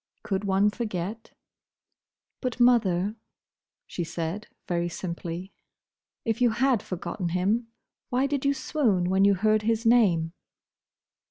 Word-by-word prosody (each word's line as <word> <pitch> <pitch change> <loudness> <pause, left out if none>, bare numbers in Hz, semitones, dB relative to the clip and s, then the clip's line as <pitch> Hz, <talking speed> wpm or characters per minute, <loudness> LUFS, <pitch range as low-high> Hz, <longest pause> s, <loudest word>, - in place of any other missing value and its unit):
Could 195 0 -2
one 200 +1 +3
forget? 210 -1 -4 1.1
"But, 250 -2 -3
mother," 215 -4 +3 0.7
she 175 - -4
said, 170 +5 -4 0.2
very 175 -1 0
simply, 175 +1 -5 0.7
"if 225 0 -1
you 245 - +5
had 240 0 +2
forgotten 180 0 -4
him, 200 +7 0 0.4
why 255 +2 +1
did 275 -1 -1
you 280 0 +2
swoon 225 - +1
when 190 +1 +4
you 200 0 +5
heard 215 +3 +2
his 225 +1 0
name?" 185 -9 +4
205 Hz, 120 wpm, -27 LUFS, 180-235 Hz, 1.1 s, you